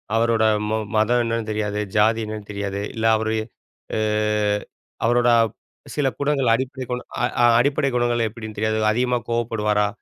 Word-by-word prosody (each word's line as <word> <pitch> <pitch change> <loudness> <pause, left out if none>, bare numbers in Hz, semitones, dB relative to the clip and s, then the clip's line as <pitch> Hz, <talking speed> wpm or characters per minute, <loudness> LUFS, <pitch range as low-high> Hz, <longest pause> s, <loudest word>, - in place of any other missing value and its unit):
அவரோட 115 -1 +2 0.3
ம 110 - +1 0.2
மதம் 120 +3 +3
என்னென்னு 115 -1 -2
தெரியாது. 105 -1 -2 0.2
ஜாதி 110 +2 +3
என்னன்னு 105 -1 -7
தெரியாது. 100 -1 -3
இல்ல, 115 0 -2
அவரு 110 0 -1 0.6
அ - - 0 1.1
அவரோட 120 -2 +3 0.4
சில 145 -2 +1
குணங்கள், 140 -4 +1
அடிப்படை 130 +1 -4
குண 125 0 -2 0.2
அ - - +5 0.2
அ - - +7
அடிப்படை 140 +2 +2
குணங்கள் 120 -1 +1
எப்டின்னு 110 -1 -9
தெரியாது. 110 0 0
அதிகமா 125 +2 +1
கோவப்படுவாரா? 105 -3 +1
115 Hz, 145 wpm, -22 LUFS, 110-120 Hz, 1.1 s, அ